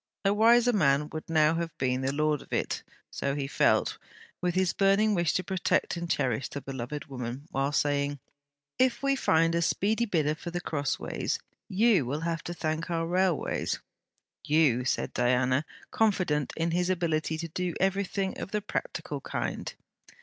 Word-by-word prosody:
A 195 - +4
wiser 235 +3 +5
man 150 -6 +3
would 155 0 -6
now 155 -1 +4
have 165 -1 -3
been 130 0 0
the 135 0 0
lord 150 0 +1
of - - -16
it.... - - -1 0.3
So 140 0 -2
he 140 -1 -2
felt, 135 - +2 0.4
with 180 -1 0
his 185 -1 +2
burning 200 +2 +3
wish 170 -4 +2
to 185 - 0
protect 185 -1 0
and 170 0 -5
cherish 130 -5 0
the 140 - -5
beloved 135 +1 -5
woman, 130 +1 -6
while 135 +1 0
saying: 145 -1 +1 0.6
'If 255 0 +2
we 275 0 +3
find 165 -9 +3
a 170 - +1
speedy 215 +7 +1
bidder 155 -8 +1
for 165 - -7
The 175 +1 -3
Crossways, 145 -5 -2 0.3
you 205 - +4
will 145 +4 -2
have 165 0 -2
to 175 - -3
thank 160 +1 -2
our 165 -1 0
railways.' 180 -1 0 0.6
'You!' 145 -5 +3
said - - -1
Diana, 125 +3 +2 0.3
confident 185 - +1
in 165 +1 0
his 180 +1 +1
ability 160 -3 0
to 165 +1 -4
do 180 +1 -2
every 195 +1 +2
thing 190 0 -3
of - - -5
the 210 +1 -1
practical 205 - -4
kind. - - -3
165 Hz, 170 wpm, -28 LUFS, 145-185 Hz, 0.6 s, wiser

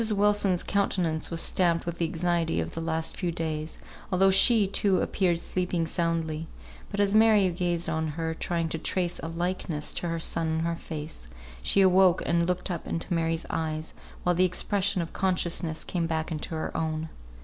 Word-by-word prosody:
Wilson's 205 -3 +2
countenance 180 -5 0
was 165 -1 -1
stamped 170 -2 +2
with 170 0 -4
the 170 - +2
anxiety 170 0 0
of - - -3
the 165 - -5
last 160 0 -2
few 180 -3 -2
days, 160 -2 -3 0.3
although 190 +1 +4
she, 215 +2 +6
too, 195 0 +2
appeared 175 -3 +1
sleeping 180 -2 -1
soundly; 165 -1 -1 0.4
but 200 - -4
as 200 0 +3
Mary 215 -3 +5
gazed 175 -1 -1
on 160 0 -1
her, 160 +1 -3
trying 165 0 -2
to 160 - -3
trace 175 0 -1
a - - -5
likeness 165 -2 -2
to 175 - -3
her 165 - -1
son 165 0 0
in 160 0 0
her 170 0 -1
face, 155 - -7 0.3
she 195 - +3
awoke 185 -1 +5
and 170 0 +2
looked 180 +1 -1
up 175 - -4
into 165 +2 -1
Mary's 165 -1 0
eyes, 155 -1 -3 0.3
while 180 - +3
the 180 +2 +3
expression 185 +1 +1
of 165 - -9
consciousness 175 -3 0
came 170 -2 -2
back 160 0 -2
into 160 +1 -4
her 155 - -4
own. 160 0 -2
170 Hz, 180 wpm, -27 LUFS, 160-185 Hz, 0.4 s, she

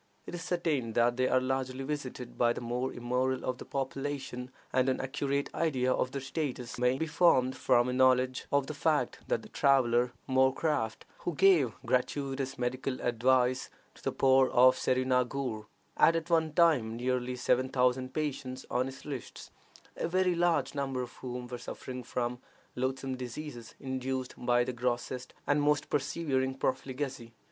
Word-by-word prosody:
It - - -8
is 175 - -5
certain 165 -9 -1
that 120 +1 +3
they 130 0 +2
are 130 - +3
largely 130 0 -2
visited 130 -4 -5
by 120 -1 +3
the - - -5
more 120 +2 -2
immoral 125 +2 -1
of 125 -1 -2
the - - -8
population, 135 -2 -4 0.2
and 130 0 +3
an 130 - 0
accurate 140 +1 -2
idea 130 -6 +1
of 130 - 0
their 140 +1 -5
status 130 -4 -4
may 125 +1 +3
be 160 - -1
formed 130 -5 +3
from 125 -1 +3
a 125 - -1
knowledge 130 0 +3
of 140 -1 +3
the 155 - -5
fact 150 +1 0
that - - 0
the - - -12
traveler 125 -3 +3 0.2
Moorcraft, 130 -2 +1
who 175 - -3
gave 170 - +4
gratuitous 135 +1 -1
medical 130 +1 -2
advice 125 +1 +2 0.2
to - - -18
the - - -1
poor 130 -1 +4
of 130 +1 +6
Serinaghur, 125 -3 0 0.3
had 165 - +5
at 165 +1 -3
one 160 -2 +3
time 150 -10 +3
nearly 125 0 -1
seven 130 +1 +1
thousand 130 0 +1
patients 130 -3 -3
on 125 +1 +1
his 135 0 -9
lists, 140 -5 -7 0.4
a - - -2
very 185 +1 +2
large 170 -1 +1
number 135 -3 -2
of 120 - -9
whom 125 -1 -5
were 120 0 -6
suffering 125 +1 -7
from 125 0 -3 0.4
loathsome 130 +1 -2
diseases 125 -1 -7
induced 130 -1 -3
by 120 0 +2
the 125 - -3
grossest 125 +1 -3
and 145 0 +2
most 145 0 +1
persevering 140 -2 0
profligacy. 130 -2 -3
130 Hz, 165 wpm, -31 LUFS, 125-140 Hz, 0.4 s, of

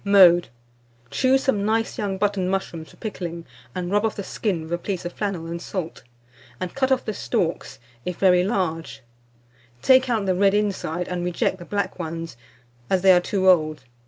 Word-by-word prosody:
Mode. 185 -4 +6 0.6
Choose 265 +1 +3
some 210 -7 +1
nice 225 +2 0
young 195 -2 -1
button 200 -2 0
mushrooms 170 -4 -3
for - - -17
pickling, 170 -6 -6 0.3
and 180 0 -3
rub 205 +1 +2
off 225 - 0
the 200 - -4
skin 185 -5 -2
with 160 +2 -6
a 175 - 0
piece 185 -1 -4
of 175 - -4
flannel 195 -6 -3
and 170 +1 -5
salt, 175 -3 -5 0.6
and 185 -1 -4
cut 265 0 0
off 260 -1 +2
the 215 - -2
stalks; 170 -7 -2 0.3
if 180 -1 -4
very 180 -2 +4
large, 180 - -2 0.8
take 260 0 +5
out 220 -4 +1
the 190 - +2
red 195 +2 +3
inside, 185 -5 -1
and 180 -1 -3
reject 180 +2 -1
the 175 - -9
black 200 -1 -2
ones, 165 -4 -5 0.5
as 190 -1 +1
they 190 - +8
are 180 -1 +6
too 190 +1 0
old. 155 -6 +3
185 Hz, 190 wpm, -23 LUFS, 175-205 Hz, 0.8 s, they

